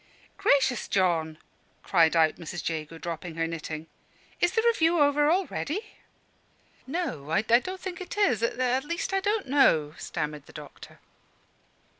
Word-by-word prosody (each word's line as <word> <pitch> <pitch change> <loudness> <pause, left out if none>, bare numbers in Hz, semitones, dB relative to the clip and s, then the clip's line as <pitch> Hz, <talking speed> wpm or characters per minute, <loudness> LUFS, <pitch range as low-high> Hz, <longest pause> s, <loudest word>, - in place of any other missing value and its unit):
"Gracious, 280 - +2
John!" 165 -5 +1 0.5
cried 165 -3 +3
out 160 -1 +3
Mrs. 175 0 -6
Jago, 160 0 -4
dropping 165 0 -6
her 165 0 0
knitting. 160 -1 -5 0.5
"Is 350 +1 +2
the 450 - +2
review 340 -8 +3
over 290 0 +4
already?" 380 +3 -1 0.9
"No, 265 - -3
I 195 +6 +2
don't 255 +12 +2
think 370 0 -6
it 370 - -7
is 390 - +2
at 255 +2 0
least, 340 +5 -3
I 390 - +3
don't 410 -1 -1
know," 160 - +3
stammered 150 -2 -4
the - - -15
doctor. 150 -1 -11
235 Hz, 140 wpm, -27 LUFS, -, 0.9 s, over